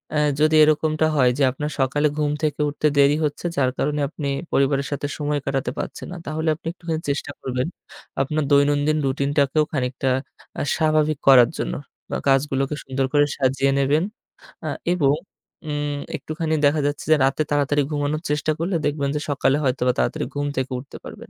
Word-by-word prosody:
আ - - +3 0.2
যদি 155 +1 +4
এরকমটা 155 +1 +2
হয়, 130 -2 +5
যে - - +4
আপনার 150 +3 -4
সকালে 145 +3 +2
ঘুম 150 -1 +1
থেকে 150 -1 0
উঠতে 150 +1 0
দেরি 140 +1 +5
হচ্ছে 150 +3 -4
যার 130 -2 +2
কারণে 150 +1 0
আপনি 150 -3 -5 0.3
পরিবারের 140 0 +2
সাথে 145 0 -2
সময় 150 -1 -1
কাটাতে 135 -2 -1
পারছেন - - -5
না। - - -7
তাহলে 160 +2 -2
আপনি 160 - -11
একটুখানি 165 -3 -4
চেষ্টা 140 0 -2
করবেন, 125 +1 -2 0.5
আপনার 150 +3 0
দৈনন্দিন 145 +2 +3
রুটিনটাকেও 140 +2 +1
খানিকটা 130 -1 -1 0.5
আ - - 0
স্বাভাবিক 155 -2 +2
করার 125 -3 +8
জন্য। - - -2 0.4
বা - - 0
কাজগুলোকে 135 +1 +1
সুন্দর 135 0 -1
করে 145 0 +5
সাজিয়ে 135 0 +2
নেবেন। 145 +4 +2 0.6
আ - - -1 0.2
এবং 145 -5 +3 0.6
উম 145 -1 -2 0.2
একটুখানি 160 0 -2
দেখা 145 +2 +3
যাচ্ছে 145 - -3
যে - - +8
রাতে 135 +3 +1
তাড়াতাড়ি 145 0 +2
ঘুমানোর 150 +1 -1
চেষ্টা 150 +1 0
করলে 175 +2 -1
দেখবেন 145 -1 0
যে - - 0
সকালে 140 0 +2
হয়তোবা 125 -1 +1
তাড়াতাড়ি - - 0
ঘুম 145 0 -1
থেকে 130 0 -1
উঠতে 135 +2 -11
পারবেন। - - -10
145 Hz, 170 wpm, -22 LUFS, 135-155 Hz, 0.6 s, করার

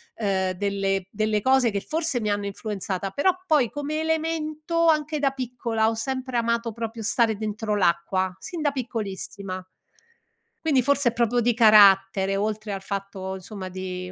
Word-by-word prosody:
uhm, 190 -3 0
delle 195 0 -1
delle 215 0 0
cose 260 -1 +3
che 200 - -1
forse 315 -5 -1
mi 210 - -1
hanno 205 0 -1
influenzata, 195 -2 -4
però 285 - +3 0.2
poi 295 -8 +3
come 290 +2 -3
elemento 320 0 -1
anche 305 -1 +2
da 275 -2 +2
piccola 240 -4 -1
ho 225 - -2
sempre 260 +1 -3
amato 235 0 0
proprio 230 0 -5
stare 225 0 +2
dentro 215 0 -2
l'acqua, 185 0 +1
sin 345 -3 -6
da 295 -1 +2
piccolissima. 200 -6 -5 1.0
Quindi 275 -5 +3
forse 280 -1 +3
è - - -5
proprio 240 0 +1
di 240 0 +2
carattere, 195 -3 +6
oltre 215 +1 -2
al 195 -1 -5
fatto, 195 -1 -5
insomma 190 0 -7
di 185 -1 -6
220 Hz, 155 wpm, -25 LUFS, 195-265 Hz, 1.0 s, carattere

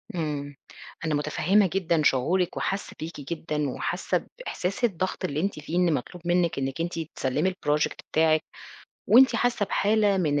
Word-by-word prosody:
إمم 145 -3 -3 0.5
أنا 155 -2 +1
متفهمة 180 +7 +2
جدًا 170 -4 +1
شعورِك 170 +8 +2
وحاسة 195 +1 -2
بيكِ 160 -1 -6
جدًا 150 -1 -3
وحاسة - - -2
بإحساس 200 - -4
الضغط 185 -5 0
اللي 145 +2 -2
أنتِ 195 -3 -1
فيه، 155 +3 -6
إن 175 -3 +3
مطلوب 170 +6 -5
منِك 175 -4 +2
إنِك 135 +4 -2
أنتِ 170 0 -3 0.2
تسلمي 130 +8 0
الProject 150 -5 0 0.2
بتاعِك 155 0 +3 0.6
وأنتِ 255 +1 +6
حاسة 240 -3 +1
بحالة 205 0 +2
من 150 -6 +1
170 Hz, 150 wpm, -26 LUFS, 150-190 Hz, 0.6 s, وأنتِ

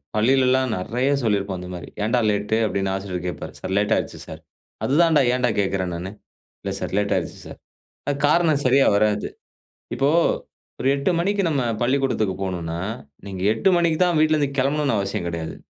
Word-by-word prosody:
பள்ளியிலல்லாம் 130 +3 +3
நிறைய 120 +8 -1
சொல்லிருப்போம் 100 -3 0
அந்த 90 - -8
மாரி. 90 - -8
"ஏன்டா 115 +3 +2
லேட்டு?" 105 +1 0
அப்படின்னு 95 -1 -1
ஆசிரியர் 95 -2 -4
கேப்பாரு. 90 - -5
“சார், 95 - -4
லேட் 105 +1 +1
ஆயிருச்சு - - -3
சார்.” - - -9 0.4
"அதுதான் 160 +3 +3
டா - - +5
ஏன்டா 125 -1 +1
கேக்குறேன் 95 -2 -1
நானு." 90 +3 -5 0.5
“இல்லை - - -3
சார், - - -5
லேட் 105 0 +1
ஆயிருச்சு - - -3
சார்.” - - -10 0.5
அ - - 0
காரணம் 155 -2 +3
சரியா 135 +2 +5
வராது. 105 0 +1 0.7
இப்போ 140 +1 +2 0.7
ஒரு 130 - +1
8 140 +4 0
மணிக்கு 200 +3 +1
நம்ம 140 -5 0 0.2
பள்ளிக்கூடத்துக்கு 125 -6 +1
போனுன்னா, 85 -3 -3 0.5
நீங்க 95 -2 -6
8 110 +12 +1
மணிக்கு 170 -2 +2
தான் 175 -2 +3
வீட்லருந்து 155 -2 +3
கெளம்பனுன்னு 140 0 +1
அவசியம் 100 -3 -2
கிடையாது. 85 -1 -4
110 Hz, 165 wpm, -22 LUFS, 95-140 Hz, 0.7 s, டா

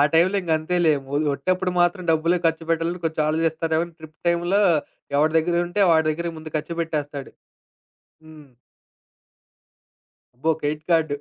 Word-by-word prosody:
టైం‌లో 180 +5 +4
ఇంగా 170 -3 -2
అంతేలే 170 +1 +1 0.2
ము 140 - -6 0.2
ఒట్టప్పుడు 185 +6 -1
మాత్రం 175 +2 +2
డబ్బులే 165 +2 +2
ఖర్చుపెట్టాలని 165 +1 -1
కొంచెం 160 -1 0
ఆలోచిస్తారేమో! 160 +1 0
ట్రిప్ 155 -1 -13
టైమ్‌లో 175 +4 +2 0.6
ఎవడి 155 +2 +3
దగ్గరుంటే 175 +3 0
వాడి 160 -1 +3
దగ్గరకి 170 +2 -3
ముందు 155 0 -10
ఖర్చు 155 +2 -4
పెట్టేస్తాడు. 145 -4 -4 0.9
హ్మ్. 155 -2 -14 1.9
అబ్బో! 140 +7 0
Credit 150 +1 -3
card. 160 -3 +3
160 Hz, 125 wpm, -23 LUFS, 155-170 Hz, 1.9 s, టైం‌లో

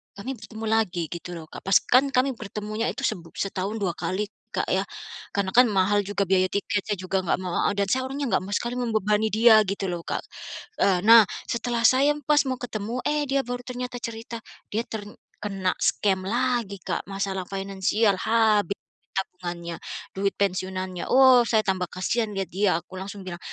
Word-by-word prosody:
kami 230 +7 -5
bertemu 220 0 -8
lagi 200 -6 +1
gitu 175 0 -6
loh 165 - -7
Kak, - - -7
pas 195 - +3
kan 260 +3 +4
kami 265 0 +2
bertemunya 215 +1 -3
itu 270 +5 -4
seb - - 0 0.2
setahun 195 +1 -2
2 195 -5 -1
kali 200 +4 -3 0.2
Kak - - +1
ya. - - +1 0.5
Karena 195 -2 0
kan 250 0 +6
mahal 205 0 +2
juga 205 -1 0
biaya 185 0 +3
tiketnya, 205 +1 -1
juga 185 +1 -1
nggak 175 - +1
mau 175 -1 0
adat 200 -1 0
saya 260 0 +1
orangnya 275 -3 -3
nggak 185 - +2
mau 205 - -4
sekali 240 +3 -2
membebani 220 -2 +1
dia 220 0 +6
gitu 195 -1 -2
loh 175 - -3
Kak. - - -2 0.6
Eee, 185 -2 +4
nah 225 -2 +8 0.2
setelah 235 0 -1
saya 275 +5 +5
pas 295 +2 +4
mau 260 - 0
ketemu, 235 +1 -4
eh 295 0 +1
dia 275 0 +2
baru 245 0 -4
ternyata 250 -1 -5
cerita, 230 0 -6 0.3
dia 220 +3 0
terkena 205 -2 -4
scam 190 -2 +1
lagi 235 -3 0
Kak, 170 - -2
masalah 195 -1 -2
finansial 195 +2 +1
habis 215 -4 +2 0.4
tabungannya, 175 -3 -4 0.3
duit 195 +1 -1
pensiunannya. 185 -2 -2
Oh 260 -2 +7
saya 220 -2 +3
tambah 185 -2 0
kasihan 210 +5 -1
lihat 195 -1 -3
dia, 190 -1 +2
aku 185 +2 -10
langsung 195 0 -7
bilang, 175 -2 -6
205 Hz, 175 wpm, -25 LUFS, 190-235 Hz, 0.6 s, nah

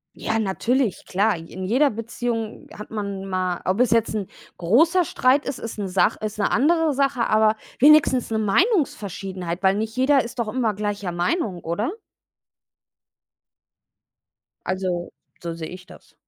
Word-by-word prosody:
Ja, 225 - -1
natürlich, 225 +3 0
klar. 205 +2 +1
J 165 +1 -11
in 185 - -6
jeder 255 +10 +3
Beziehung 230 0 -4
hat 210 - -9
man 200 -3 -4
mal 185 -2 -2
ob 190 +4 0
es 250 -3 +3
jetzt 230 -1 +2
'n 205 -3 -2 0.3
großer 320 - +3
Streit 265 +2 +2
ist, 275 - -4
ist 230 - -6
'ne 200 -2 -3
Sach 185 +1 +2
ist 215 0 -5
'ne 200 - +1
andere 315 +5 +3
Sache, 275 -2 0
aber 215 0 +4 0.2
wenigstens 280 -4 +5
'ne 220 - 0
Meinungsverschiedenheit, 195 - 0
weil 190 0 +3
nicht 220 +2 -3
jeder 265 +1 +3
ist 245 +2 -8
doch 230 - 0
immer 225 -2 0
gleicher 205 -2 -3
Meinung, 180 - -1
oder? 205 - -2 2.8
Also, 185 -2 -2 0.3
so 170 -1 -4
sehe 160 -1 -6
ich 185 0 -10
das. - - -17
215 Hz, 155 wpm, -23 LUFS, 190-255 Hz, 2.8 s, wenigstens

